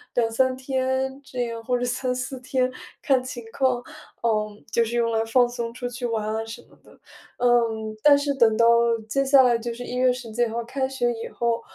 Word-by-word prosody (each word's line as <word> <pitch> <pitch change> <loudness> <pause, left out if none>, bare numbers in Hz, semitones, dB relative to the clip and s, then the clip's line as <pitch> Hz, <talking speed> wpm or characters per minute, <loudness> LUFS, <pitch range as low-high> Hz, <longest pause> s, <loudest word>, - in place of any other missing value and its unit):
2-3 245 +2 +1
天 265 0 -2
这 250 -2 -3
样， 230 -1 -6
或 250 +2 0
者 245 - -2
3-4 255 +1 -2
天 255 0 0 0.3
看 265 -2 +3
情 250 -2 -7
况， 255 -2 +1 0.4
嗯， 215 -2 -1
就 235 - +3
是 230 +1 -3
用 230 -1 +1
来 225 0 +1
放 245 +2 +4
松 240 -1 -4
出 245 +1 -5
去 245 0 -4
玩 220 -2 -2
啊 220 +1 -2
什 225 0 -9
么 - - -23
的。 - - -20 0.4
嗯， 230 -3 +1
但 290 -1 +7
是 285 0 -1
等 230 -5 +3
到， 230 - +5 0.4
接 275 +5 +1
下 270 -1 +6
来 240 -2 +4
就 235 +1 -4
是 245 - -7
一 245 - -5
月 255 0 +3
10 240 -3 -6
几 240 +2 +1
号 230 +1 -3
开 265 +3 -2
学 245 -3 0
以 230 0 -6
后， 235 -1 -1
245 Hz, 210 characters per minute, -24 LUFS, 230-260 Hz, 0.4 s, 但